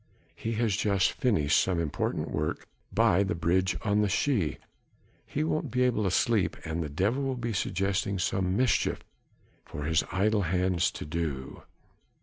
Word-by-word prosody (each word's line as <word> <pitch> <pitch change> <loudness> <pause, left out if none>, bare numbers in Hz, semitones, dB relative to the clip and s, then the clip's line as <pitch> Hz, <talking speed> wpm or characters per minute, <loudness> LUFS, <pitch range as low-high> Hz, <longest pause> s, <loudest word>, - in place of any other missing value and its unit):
he 115 - -4
has 110 -2 +1
just 100 -3 +2
finished 80 - +2
some 90 -3 0
important 80 -4 -2
work 75 0 -2 0.2
by 85 - +3
the 100 +1 0
bridge 90 +3 +1
on 105 0 +2
the 105 - +2
Schie... 100 - 0 0.7
he 150 - -1
won't 155 -2 -1
be 125 +2 +1
able 125 -4 +1
to - - +2
sleep 105 +1 +1
and 80 +1 -2
the 75 - -3
devil 100 - 0
will 135 -1 -1
be 120 -1 -3
suggesting 100 +1 -1
some 95 0 0
mischief 125 -1 +1 0.6
for 75 - -7
his 80 +2 +2
idle 105 +3 +2
hands 90 0 +1
to - - -7
do. 75 -4 -4
95 Hz, 160 wpm, -28 LUFS, 85-110 Hz, 0.7 s, by